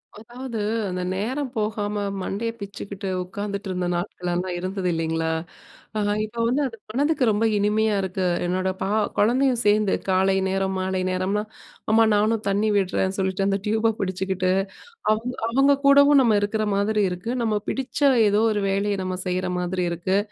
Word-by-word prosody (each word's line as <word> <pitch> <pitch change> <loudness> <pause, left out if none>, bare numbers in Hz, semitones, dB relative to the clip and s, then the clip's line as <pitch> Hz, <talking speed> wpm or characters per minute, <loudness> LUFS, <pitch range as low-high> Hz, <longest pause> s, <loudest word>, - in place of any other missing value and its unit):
அதாவது, 235 +2 -7 0.3
அந்த 180 0 -3
நேரம் 255 +7 -2
போகாம 210 -1 -2 0.2
மண்டைய 220 +5 -2
பிச்சுக்கிட்டு, 200 -1 -6
உக்காந்துட்டுருந்த 200 -2 -4
நாட்கள்லலாம் 180 0 -3
இருந்தது 185 0 -3
இல்லைங்களா! 160 0 -1 0.7
ஆனா 205 -1 +1
இப்ப 215 +2 -6
வந்து 265 +5 +1
அது 230 -3 -10
மனதுக்கு 285 +3 +1
ரொம்ப 215 +1 +1
இனிமையா 210 +1 +2
இருக்கு. 190 0 -2 0.2
என்னோட 185 +1 0
பா 190 - -1 0.3
குழந்தையும் 250 +3 +3
சேந்து 210 -1 +3 0.2
காலை 190 +1 +3
நேரம், 190 0 -1
மாலை 185 0 -1
நேரம்லாம், 195 +4 -1 0.4
அம்மா 225 +1 +6
நானும் 215 +1 +1
தண்ணி 205 +2 +1
விடுறேன்னு 190 -1 0
சொல்லிட்டு 190 +1 0
அந்த 195 0 +1
டியூப 220 +1 +2
பிடிச்சுக்கிட்டு, 185 -1 -1 0.6
அவுங்க 235 +4 -1
அவுங்க 275 +4 +4
கூடவும் 280 0 +7
நம்ம 220 -4 +4
இருக்கிற 215 +1 0
மாதிரி 210 +1 +1
இருக்கு. 180 +5 -5
நம்ம 220 -2 +1
பிடிச்ச 270 +2 -3 0.3
ஏதோ 205 +1 +3
ஒரு 205 -1 -1
வேலைய, 200 +1 0
நம்ம 185 0 -3
செய்ற 185 0 -1
மாதிரி 180 0 -1
இருக்கு. 175 +3 0
205 Hz, 150 wpm, -24 LUFS, 185-220 Hz, 0.7 s, கூடவும்